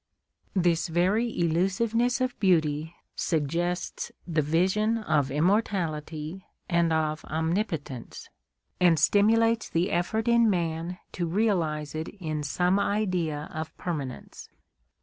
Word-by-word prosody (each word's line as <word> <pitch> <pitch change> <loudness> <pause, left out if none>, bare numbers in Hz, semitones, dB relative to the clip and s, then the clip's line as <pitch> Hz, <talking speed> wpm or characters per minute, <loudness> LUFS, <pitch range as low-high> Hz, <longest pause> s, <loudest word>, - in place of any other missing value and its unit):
This 175 -2 +2
very 185 +8 +2
elusiveness 210 +9 +1
of 255 -1 -1
beauty 160 -4 +1 0.2
suggests 170 +3 -1
the 165 -3 +1
vision 190 +9 +2
of 150 -11 +1
immortality 165 -1 -1 0.2
and 170 -2 +2
of 155 -1 0
omnipotence, 160 - -3 0.5
and 175 -3 +5
stimulates 225 +4 +3
the 175 +4 0
effort 220 +6 0
in 235 -1 +5
man 170 -1 -1
to 175 -2 -2
realise 165 -6 0
it 155 +1 -4
in 155 -4 -3
some 180 +7 +1
idea 180 -8 -1
of 155 0 -6
permanence. 145 -8 -5
175 Hz, 110 wpm, -27 LUFS, 155-200 Hz, 0.5 s, and